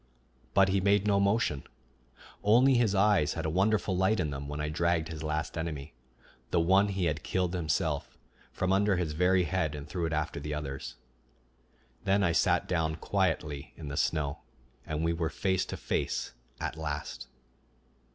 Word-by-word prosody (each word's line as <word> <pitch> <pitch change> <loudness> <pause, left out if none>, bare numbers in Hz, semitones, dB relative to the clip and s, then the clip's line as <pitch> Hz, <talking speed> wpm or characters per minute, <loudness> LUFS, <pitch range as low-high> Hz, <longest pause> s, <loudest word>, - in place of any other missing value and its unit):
But 95 -1 +5
he 95 0 +2
made 100 +1 +3
no 100 -1 +3
motion; 100 - +1 0.8
only 125 +6 +5
his 115 -5 +3
eyes 95 -7 +3
had 80 0 -3
a 80 - 0
wonderful 95 +2 +2
light 95 +4 +2
in 75 -5 0
them 70 0 -5
when 75 +1 -5
I 75 - -1
dragged 85 +1 0
his 80 -2 -6
last 75 0 -2
enemy, 80 -2 -5 0.6
the 85 - +2
one 95 +4 +4
he 95 -3 -1
had 75 -2 -1
killed 90 +1 -1
himself, 80 -3 -1 0.3
from 95 +1 0
under 100 0 +3
his 85 -3 -1
very 90 +3 +3
head 85 -4 -1
and 75 +1 -7
threw 85 +1 -2
it - - -4
after 75 -1 -2
the 75 +1 -4
others. 70 -2 -5 1.1
Then 100 0 +2
I 85 - +3
sat 85 +1 +2
down 80 -3 0
quietly 75 -3 -1
in 75 -3 -7
the 70 - -4
snow, 75 -3 0 0.5
and 75 +1 -2
we 85 0 +2
were 80 -1 -1
face 95 +1 0
to - - -5
face - - -2 0.3
at - - -3
last. 75 -5 -5
85 Hz, 175 wpm, -30 LUFS, 75-95 Hz, 1.1 s, But